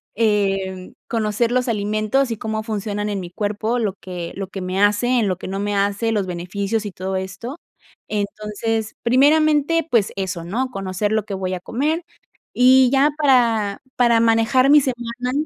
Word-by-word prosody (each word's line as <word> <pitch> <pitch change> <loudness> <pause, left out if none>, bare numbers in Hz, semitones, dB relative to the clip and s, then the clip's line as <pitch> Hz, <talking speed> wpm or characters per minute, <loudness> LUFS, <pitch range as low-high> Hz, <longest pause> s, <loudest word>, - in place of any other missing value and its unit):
em, 195 -4 0
conocer 225 +1 0
los 250 0 +1
alimentos 215 +4 0
y 225 - -3
cómo 220 0 -3
funcionan 210 -1 -3
en 200 -1 -2
mi 175 -2 -7
cuerpo, 215 +4 -2
lo 205 -4 -1
que 175 -2 -6
lo 195 0 -4
que 195 0 -7
me 185 +2 -2
hace, 240 +5 +3
en 210 - +1
lo 185 -1 -1
que - - -8
no 195 +1 -3
me 205 0 -1
hace, 200 +3 0
los 210 -3 0
beneficios, 200 +5 -3
y - - -6
todo 190 +2 -4
esto. 195 - -5 0.5
Entonces, 215 +1 -3
primeramente, 300 +5 +3
pues, 225 -5 +2
eso, 185 -3 -3
¿no? 245 +9 -2
Conocer 195 +1 -2
lo 215 -1 0
que 205 - -6
voy 185 -1 -3
a 180 - -3
comer, 300 - -1 0.5
y 255 0 +6
ya 280 +2 +4
para 235 -8 +2
para 235 -2 +4
manejar 230 +4 +3
mi 295 -1 +7
semana 245 -1 -3
215 Hz, 175 wpm, -21 LUFS, 195-245 Hz, 0.5 s, mi